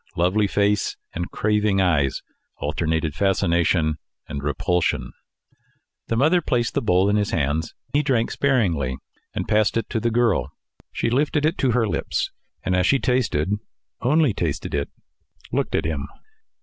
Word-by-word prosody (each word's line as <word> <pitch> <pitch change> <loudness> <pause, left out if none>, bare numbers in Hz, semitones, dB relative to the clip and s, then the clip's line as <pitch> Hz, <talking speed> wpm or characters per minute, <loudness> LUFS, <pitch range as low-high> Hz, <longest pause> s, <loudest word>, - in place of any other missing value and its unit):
Lovely 95 +5 +2
face 100 0 +1 0.2
and 85 +1 -3
craving 105 -1 +1
eyes 80 -8 +1 0.3
alternated 80 -2 -1
fascination 85 -4 +1 0.3
and 70 -2 -5
repulsion. 80 +4 0 1.0
The 115 - 0
mother 160 +8 +4
placed 120 -6 0
the - - 0
bowl 95 -2 +3
in 105 +1 +3
his 105 0 0
hands. 80 +1 -1 0.2
He 145 - +4
drank 125 -6 +1
sparingly, 85 - +1 0.4
and - - -2
passed 110 +1 +2
it 115 - -3
to 115 - 0
the 120 - +1
girl. 115 -2 +2 0.4
She 115 - -1
lifted 145 +3 +1
it 160 - +2
to 130 -3 +2
her 115 -2 +2
lips, - - -1 0.3
and 95 - +1
as 90 0 +2
she 140 - +4
tasted 120 - 0 0.5
only 145 -1 +3
tasted 80 -6 -3
it 70 -1 -1 0.6
looked - - 0
at - - 0
him. 70 -3 -2
100 Hz, 150 wpm, -23 LUFS, 80-120 Hz, 1.0 s, mother